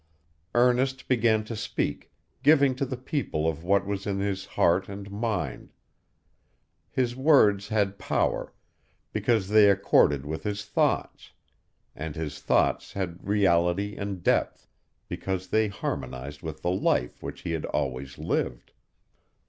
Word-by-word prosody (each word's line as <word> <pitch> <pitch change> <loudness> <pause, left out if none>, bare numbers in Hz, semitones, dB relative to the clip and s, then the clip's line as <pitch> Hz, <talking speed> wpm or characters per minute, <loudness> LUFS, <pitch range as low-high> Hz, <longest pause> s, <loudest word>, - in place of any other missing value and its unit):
Ernest 125 +2 +2
began 115 -3 +3
to 115 +2 -6
speak, 105 - -3 0.3
giving 140 -2 +5
to 130 +1 -2
the 130 -1 -4
people 130 - -2
of 80 0 -2
what 100 +2 +2
was 100 0 -3
in 100 -1 -1
his 100 -1 -2
heart 90 +3 +2
and 100 0 -8
mind. 100 - -3 1.2
His 120 -2 -1
words 125 -8 +4
had 100 -3 0
power, - - 0 0.6
because 110 -5 +1
they 105 -1 +7
accorded 75 -8 +3
with 80 +2 -4
his 105 0 -3
thoughts; - - -1 0.6
and 75 0 -5
his 75 -3 -5
thoughts - - +1
had 90 -2 -5
reality 100 0 +2
and 100 -3 -5
depth, - - +1 0.4
because 95 -1 -4
they 110 0 +3
harmonized 70 -7 -5
with 80 -2 -7
the 90 - +1
life 90 -9 0
which - - -7
he - - -4
had 80 -2 -2
always 70 -2 -3
lived. - - -2
100 Hz, 135 wpm, -27 LUFS, 80-110 Hz, 1.2 s, they